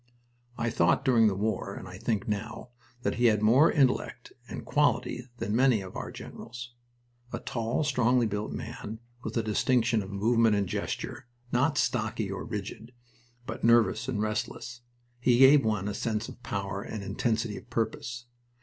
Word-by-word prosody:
I 115 0 -1
thought 90 +10 +2
during 115 -4 +5
the 100 - +1
war, 105 +1 -2
and - - -8
I - - -9
think 105 -4 -1
now, 110 +4 -4 0.3
that - - 0
he 120 - +2
had 105 -2 +4
more 130 +9 +6
intellect 135 -4 +1 0.2
and - - -6
"quality" 125 +1 +1
than 105 -1 -2
many 125 -3 +4
of 95 -1 -9
our - - -4
other - - -8
generals. 120 +1 -9 0.6
A - - -2
tall, 115 +5 -2
strongly 125 -3 +3
built 105 0 -2
man, 110 +2 -6 0.2
with 110 -1 -4
a 115 - +1
distinction 115 +1 +2
of 95 - -7
movement 110 +2 +3
and 100 -1 0
gesture, 120 - -4 0.2
not 140 +5 +2
"stocky" 115 -5 0
or 95 - -4
rigid, 110 +2 -6 0.5
but - - -6
nervous 115 0 +4
and 125 -6 -2
restless, 115 +2 -3 0.4
he 120 0 +3
gave 135 +2 +7
one 105 -3 0
a 105 - -2
sense 110 +1 -2
of - - -11
power 100 -4 -3
and 105 0 -6
intensity 110 +2 -1
of - - -11
purpose. 120 +1 -3
115 Hz, 170 wpm, -29 LUFS, 105-120 Hz, 0.6 s, gave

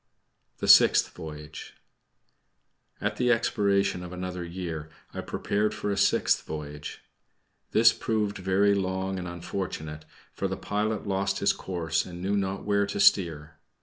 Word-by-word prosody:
THE - - -3
SIXTH - - +7
VOYAGE 75 0 -9 1.2
At 105 0 -2
the 125 -1 +2
expiration 100 -5 +1
of 90 -1 -8
another 90 0 -5
year, 85 -3 -5 0.2
I - - -4
prepared 105 +1 -1
for 105 - -2
a - - 0
sixth - - +2
voyage. 75 -1 -7 0.7
This 110 0 +6
proved 105 -2 -1
very 95 +2 +3
long 95 0 -1
and 90 - -5
unfortunate, 85 -3 -5 0.3
for 100 - -2
the 95 0 -4
pilot 105 +1 -2
lost 100 0 0
his 100 - +2
course 80 -3 -2
and 90 -1 -9
knew 95 +3 -1
not 95 -1 -2
where 100 -1 +2
to - - -4
steer. 80 -7 +3
95 Hz, 145 wpm, -27 LUFS, 85-100 Hz, 1.2 s, SIXTH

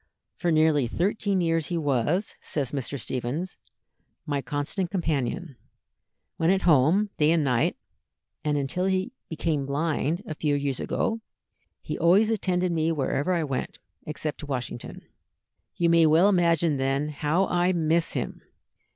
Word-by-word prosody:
"For 175 - 0
nearly 155 -4 +3
thirteen 195 - 0
years 165 -2 +1
he 175 - -2
was," 150 - 0
says 140 -5 -2
Mr. 140 0 -3
Stephens, 130 +10 -3 0.7
"my 145 -3 -1
constant 145 +7 -2
companion, 160 - -2 0.8
when 165 - +2
at 190 0 +2
home, 170 +7 +4
day 150 0 +3
and 165 -1 +3
night, 125 -4 +1 0.7
and 150 -1 +1
until 145 +6 -1
he 190 +5 0 0.2
became 155 -4 -1
blind, 155 +4 -1
a 210 - -4
few 150 -1 0
years 140 -2 -1
ago, 225 0 -1 0.6
he - - -4
always 200 +6 +4
attended 185 -4 0
me 165 0 +1
wherever 145 +2 0
I 170 -3 +1
went, 135 -4 -3 0.3
except 150 0 -4
to 150 - -8
Washington. 125 -3 -5 0.7
You 170 - +1
may 165 -1 +5
well 165 +6 +5
imagine, 170 -5 +3
then, 135 +2 0
how 150 +5 +1
I 180 0 +2
miss 165 -1 +1
him! - - -4
160 Hz, 145 wpm, -26 LUFS, 145-180 Hz, 0.8 s, may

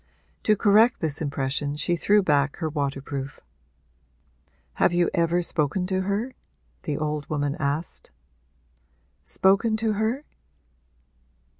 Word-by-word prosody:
To 215 - +5
correct 215 +4 +4
this 155 -2 -2
impression 145 0 -2
she 175 +3 0
threw 205 +4 +3
back 145 -4 +2
her 160 - -3
waterproof. 140 -2 -4 1.3
'Have - - +2
you 175 0 +2
ever 170 +1 +1
spoken 165 +3 0
to 190 0 -1
her?' 205 +7 -2 0.5
the 145 -2 -3
old 150 -1 -3
woman 145 -1 -1
asked. 145 +3 -3 1.1
'Spoken 200 +4 +2
to 220 -1 0
her?' 220 +7 -1
165 Hz, 115 wpm, -25 LUFS, 145-200 Hz, 1.3 s, To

